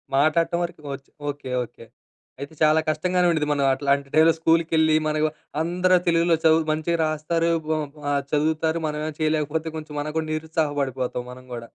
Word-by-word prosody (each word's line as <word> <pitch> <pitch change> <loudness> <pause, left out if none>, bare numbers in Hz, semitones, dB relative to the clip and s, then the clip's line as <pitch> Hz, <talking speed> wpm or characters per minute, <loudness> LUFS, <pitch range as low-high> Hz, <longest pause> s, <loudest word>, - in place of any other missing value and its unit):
మాట్లాడటం 165 +4 +2
వరకు 170 -3 -6
వచ్చు. 135 0 -10 0.2
ఓకే. 140 -3 -6
ఓకే. 115 -1 -13 0.6
అయితే 140 +3 -7
చాలా 155 +1 +5
కష్టంగానే 180 +3 +1
ఉండుద్ది. 155 -2 0
మనం 140 -1 +1
అట్లాంటి 140 0 0
టైమ్‌లో 160 +1 +6
స్కూల్‌కెళ్ళి 160 -1 +3
మరేమో 155 0 +1 0.3
అందరూ 180 +2 +2
తెలుగులో 165 0 +3
చదువు 160 0 +5
మంచిగా 160 +2 0
రాస్తారు. 160 +2 0 0.3
ఓమ్ 150 -2 -3 0.2
ఆహ్, 140 0 +1
చదువుతారు. 160 +2 +1
మనమేమొ 150 +1 -3
చేయలేకపోతే 155 +1 0
కొంచెం 155 -1 -8
మనకు 155 +1 -5
కూడా 155 -1 -4
నిరుత్సాహ 160 0 -1
పడిపోతాం 125 -2 -3
మనం 130 0 -13
గూడా! 115 -1 -7
155 Hz, 160 wpm, -24 LUFS, 145-165 Hz, 0.6 s, టైమ్‌లో